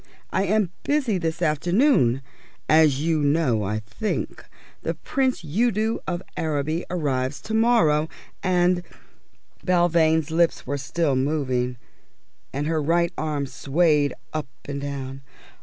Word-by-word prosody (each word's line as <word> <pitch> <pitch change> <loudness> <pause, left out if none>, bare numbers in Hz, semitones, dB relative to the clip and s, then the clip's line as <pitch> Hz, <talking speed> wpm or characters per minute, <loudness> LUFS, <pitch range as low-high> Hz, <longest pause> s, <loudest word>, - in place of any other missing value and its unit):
I 190 - +1
am 205 -2 +2
busy 265 -10 +1
this 165 0 -2
afternoon. 160 - +3 0.4
As 155 -3 +5
you 160 -1 +2
know, 145 -6 +2
I 105 +2 -1
think, 110 - -4 0.4
the - - -2
Prince 260 - -1
Udo 220 +6 +1
of 175 0 -2
Araby 155 +1 -1
arrives 140 -5 -1
to 220 - -6
morrow, 195 -10 +3 0.3
and 180 -1 +2 0.4
" - - -38
Belvane's 165 -3 +3
lips 165 +1 +2
were 140 +2 -2
still 140 +2 0
moving, 130 -3 0 0.7
and 140 +2 -2
her 160 0 0
right 170 +3 +1
arm 150 -2 -2
swayed 145 +1 +1 0.2
up 155 -2 -2 0.2
and 140 0 -4
down. 135 -1 -5
160 Hz, 125 wpm, -24 LUFS, 140-180 Hz, 0.7 s, As